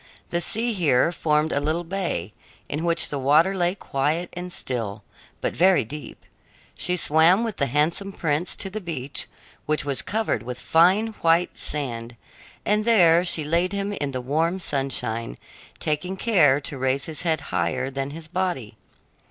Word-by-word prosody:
The 170 Hz, -, 0 dB
sea 230 Hz, +6 st, 0 dB
here 160 Hz, -5 st, +3 dB
formed 155 Hz, -2 st, +1 dB
a -, -, +1 dB
little 155 Hz, +4 st, -1 dB
bay, 170 Hz, -, -3 dB, 0.3 s
in 150 Hz, +3 st, -3 dB
which 170 Hz, -1 st, +2 dB
the 145 Hz, -, -3 dB
water 150 Hz, +8 st, +4 dB
lay 175 Hz, 0 st, +1 dB
quiet 155 Hz, +1 st, -1 dB
and 180 Hz, 0 st, -6 dB
still, 115 Hz, -, -3 dB, 0.4 s
but -, -, -1 dB
very 180 Hz, -8 st, +4 dB
deep. 150 Hz, +5 st, -9 dB, 0.5 s
She 180 Hz, 0 st, -1 dB
swam 165 Hz, +6 st, +4 dB
with 225 Hz, -4 st, -3 dB
the 140 Hz, -, +1 dB
handsome 155 Hz, +9 st, 0 dB
prince 160 Hz, -1 st, +1 dB
to 195 Hz, -, -5 dB
the 215 Hz, +2 st, -5 dB
beach, 145 Hz, -6 st, -4 dB, 0.4 s
which 150 Hz, -2 st, 0 dB
was 140 Hz, -3 st, 0 dB
covered 220 Hz, -, -1 dB
with 125 Hz, +1 st, -6 dB
fine 185 Hz, +7 st, +4 dB
white 165 Hz, +2 st, +3 dB
sand, 120 Hz, -5 st, -4 dB, 0.5 s
and 210 Hz, +1 st, +2 dB
there 175 Hz, -7 st, +5 dB
she 170 Hz, -3 st, 0 dB
laid 170 Hz, +5 st, +1 dB
him 200 Hz, +1 st, -2 dB
in 145 Hz, -8 st, -2 dB
the 130 Hz, -2 st, -4 dB
warm 160 Hz, +8 st, 0 dB
sunshine, 135 Hz, -8 st, -2 dB, 0.4 s
taking 155 Hz, +5 st, -2 dB
care 165 Hz, -, +4 dB
to 135 Hz, -1 st, -4 dB
raise 130 Hz, +1 st, 0 dB
his 160 Hz, -2 st, -4 dB
head 160 Hz, -3 st, +1 dB
higher 85 Hz, +11 st, 0 dB
than 135 Hz, 0 st, -3 dB
his 160 Hz, +2 st, -8 dB
body. 170 Hz, -, -3 dB
160 Hz, 165 wpm, -24 LUFS, 135-180 Hz, 0.5 s, there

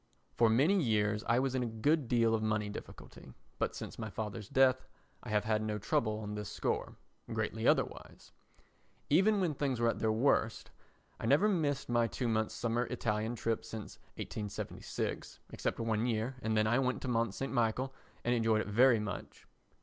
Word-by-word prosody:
For 115 Hz, +11 st, +4 dB
many 150 Hz, -, +4 dB
years 105 Hz, -4 st, +1 dB
I 115 Hz, -, +3 dB
was 130 Hz, 0 st, +1 dB
in 130 Hz, -, 0 dB
a 120 Hz, -, -1 dB
good 135 Hz, +6 st, +1 dB
deal 115 Hz, -2 st, +3 dB
of 110 Hz, -, +1 dB
money 110 Hz, -1 st, 0 dB
difficulty, 105 Hz, -, -10 dB, 0.3 s
but -, -, -1 dB
since -, -, -7 dB
my 110 Hz, -1 st, -4 dB
father's 105 Hz, 0 st, -5 dB
death 130 Hz, -2 st, +3 dB, 0.3 s
I 125 Hz, -, -9 dB
have 105 Hz, -1 st, +2 dB
had 110 Hz, 0 st, +1 dB
no 110 Hz, -1 st, -2 dB
trouble 105 Hz, +1 st, 0 dB
on 105 Hz, -1 st, -5 dB
this 105 Hz, -1 st, -5 dB
score—greatly -, -, -3 dB
otherwise. -, -, 0 dB, 0.8 s
Even 200 Hz, +7 st, +5 dB
when 175 Hz, -5 st, +1 dB
things 135 Hz, -3 st, -1 dB
were 120 Hz, 0 st, +3 dB
at -, -, -2 dB
their 110 Hz, -, +2 dB
worst, 115 Hz, -1 st, +1 dB, 0.5 s
I -, -, -3 dB
never 145 Hz, -, +5 dB
missed 150 Hz, -9 st, 0 dB
my 120 Hz, -1 st, +2 dB
two 120 Hz, +3 st, -3 dB
months' 110 Hz, -1 st, 0 dB
summer 120 Hz, +1 st, 0 dB
Italian 110 Hz, +1 st, -1 dB
trip 115 Hz, -1 st, -1 dB
since 110 Hz, -2 st, -8 dB, 0.2 s
1876, 105 Hz, -2 st, -5 dB
except -, -, -3 dB
one 115 Hz, 0 st, 0 dB
year 115 Hz, +2 st, -1 dB
and 110 Hz, -1 st, 0 dB
then 110 Hz, -, +3 dB
I 120 Hz, +4 st, +3 dB
went 130 Hz, -1 st, -1 dB
to -, -, -3 dB
Mont 115 Hz, -4 st, 0 dB
St. 135 Hz, +7 st, -3 dB
Michel 120 Hz, +3 st, 0 dB, 0.3 s
and 120 Hz, -, +2 dB
enjoyed 115 Hz, -2 st, +2 dB
it -, -, -5 dB
very 120 Hz, +3 st, +5 dB
much. 105 Hz, -2 st, -6 dB
115 Hz, 180 wpm, -33 LUFS, 110-130 Hz, 0.8 s, Even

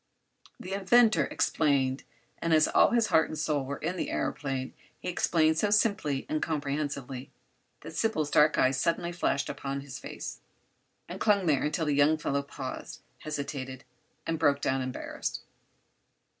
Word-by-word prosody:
The 185 Hz, -, -6 dB
inventor 215 Hz, +4 st, +4 dB
explained, 135 Hz, -4 st, +1 dB, 0.3 s
and 165 Hz, -1 st, +2 dB
as 155 Hz, -, +5 dB
all -, -, +5 dB
his 235 Hz, -2 st, +2 dB
heart 160 Hz, -1 st, +5 dB
and 155 Hz, -, -5 dB
soul 150 Hz, -2 st, 0 dB
were 140 Hz, +1 st, -4 dB
in 175 Hz, +4 st, -3 dB
the -, -, -2 dB
aëroplane 135 Hz, -2 st, -2 dB, 0.3 s
he -, -, -7 dB
explained 160 Hz, -2 st, +2 dB
so 210 Hz, -, +2 dB
simply 200 Hz, -10 st, +1 dB
and 155 Hz, -, -1 dB
comprehensively 140 Hz, -4 st, -3 dB, 0.5 s
that -, -, -9 dB
Sybil's 155 Hz, -10 st, 0 dB
dark 150 Hz, +1 st, +5 dB
eyes 130 Hz, +1 st, +3 dB
suddenly 170 Hz, 0 st, 0 dB
flashed 170 Hz, -4 st, 0 dB
upon 140 Hz, 0 st, -4 dB
his 140 Hz, -2 st, -8 dB
face, -, -, -7 dB, 0.7 s
and -, -, -7 dB
clung 200 Hz, -3 st, +3 dB
there 150 Hz, -5 st, +3 dB
until 155 Hz, +2 st, -1 dB
the 150 Hz, -, +1 dB
young 145 Hz, +2 st, +4 dB
fellow 140 Hz, -2 st, -1 dB
paused, 140 Hz, -1 st, -7 dB, 0.2 s
hesitated, 140 Hz, -3 st, -5 dB, 0.4 s
and 165 Hz, -1 st, -2 dB
broke 145 Hz, -3 st, +3 dB
down 135 Hz, -1 st, 0 dB
embarrassed. 130 Hz, 0 st, -4 dB
150 Hz, 155 wpm, -29 LUFS, 140-165 Hz, 0.7 s, as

